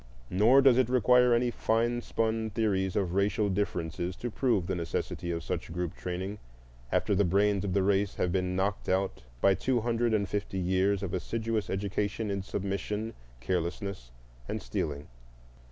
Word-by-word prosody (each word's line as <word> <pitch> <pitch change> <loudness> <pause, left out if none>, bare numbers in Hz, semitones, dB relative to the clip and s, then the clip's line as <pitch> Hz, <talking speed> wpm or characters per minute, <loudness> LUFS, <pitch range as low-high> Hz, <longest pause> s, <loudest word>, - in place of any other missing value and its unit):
Nor 115 +9 +5
does 130 -2 +6
it 125 -2 +2
require 125 0 +5
any 120 +1 +3
fine 120 +2 +1
spun 110 -1 -1
theories 100 -4 0
of 95 -4 0
racial 100 +1 +1
differences 90 -2 -2
to 120 +3 -5
prove 115 -6 +1
the 95 - -2
necessity 85 0 -3
of 85 -1 -2
such - - -4
group 90 -1 -3
training 95 +3 -5 0.5
after - - +1
the 100 +1 +3
brains 100 +2 +2
of 95 -2 -2
the 100 0 +2
race 100 0 +1
have 90 - 0
been 90 0 0
knocked 100 +2 -1
out 95 +1 0 0.2
by 100 - +5
two 125 +4 0
hundred 115 0 +1
and 100 -2 0
fifty 100 0 -3
years 95 +2 +1
of 90 - -3
assiduous 110 +4 -2
education 100 +2 -2
in 100 0 -1
submission, 100 +3 -3 0.3
carelessness, 90 - -3 0.4
and - - -2
stealing. 70 +4 -3
100 Hz, 165 wpm, -29 LUFS, 95-110 Hz, 0.5 s, does